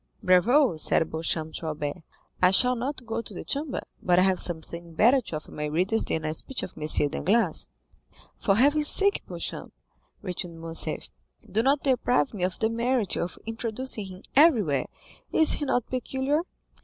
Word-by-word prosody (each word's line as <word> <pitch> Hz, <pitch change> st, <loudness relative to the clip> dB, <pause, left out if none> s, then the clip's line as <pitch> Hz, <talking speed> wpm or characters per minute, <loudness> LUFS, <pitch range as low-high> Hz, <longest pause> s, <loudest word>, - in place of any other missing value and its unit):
"Bravo," 200 Hz, -, +4 dB
said 160 Hz, +1 st, +2 dB
Beauchamp 160 Hz, 0 st, -1 dB
to 165 Hz, -, -3 dB
Albert; 150 Hz, +1 st, -4 dB, 0.4 s
"I 180 Hz, -, +6 dB
shall 250 Hz, +7 st, +4 dB
not 255 Hz, +1 st, -4 dB
go 225 Hz, 0 st, -3 dB
to 220 Hz, -, -10 dB
the -, -, -6 dB
Chamber, 285 Hz, 0 st, -2 dB, 0.2 s
but 175 Hz, -1 st, +2 dB
I 185 Hz, -, +6 dB
have 190 Hz, -1 st, +2 dB
something 170 Hz, 0 st, -5 dB
better 245 Hz, -, +5 dB
to 190 Hz, -, -6 dB
offer 155 Hz, -, -8 dB
my 150 Hz, -, -4 dB
readers 180 Hz, +9 st, +1 dB
than 160 Hz, -1 st, -2 dB
a 155 Hz, -, -1 dB
speech 260 Hz, +10 st, -4 dB
of -, -, -6 dB
M. 155 Hz, -, -5 dB, 0.2 s
Danglars." 190 Hz, +10 st, +1 dB, 0.7 s
"For 195 Hz, -, +2 dB
heaven's 290 Hz, +6 st, +4 dB
sake, 400 Hz, +4 st, +2 dB
Beauchamp," -, -, -5 dB, 0.5 s
returned 180 Hz, -3 st, -5 dB
Morcerf, 165 Hz, 0 st, -4 dB, 0.4 s
"do 215 Hz, -, 0 dB
not 275 Hz, +4 st, +2 dB
deprive 255 Hz, -1 st, +1 dB
me 200 Hz, -, -6 dB
of 180 Hz, -1 st, -1 dB
the 220 Hz, -, +1 dB
merit 235 Hz, -2 st, 0 dB
of 175 Hz, -, -3 dB
introducing 225 Hz, -1 st, -4 dB
him 185 Hz, 0 st, -11 dB
everywhere. 220 Hz, -, +4 dB, 0.4 s
Is 315 Hz, -, +5 dB
he 295 Hz, -, +1 dB
not 245 Hz, -3 st, 0 dB
peculiar?" 265 Hz, +4 st, -1 dB
210 Hz, 170 wpm, -26 LUFS, 170-260 Hz, 0.7 s, I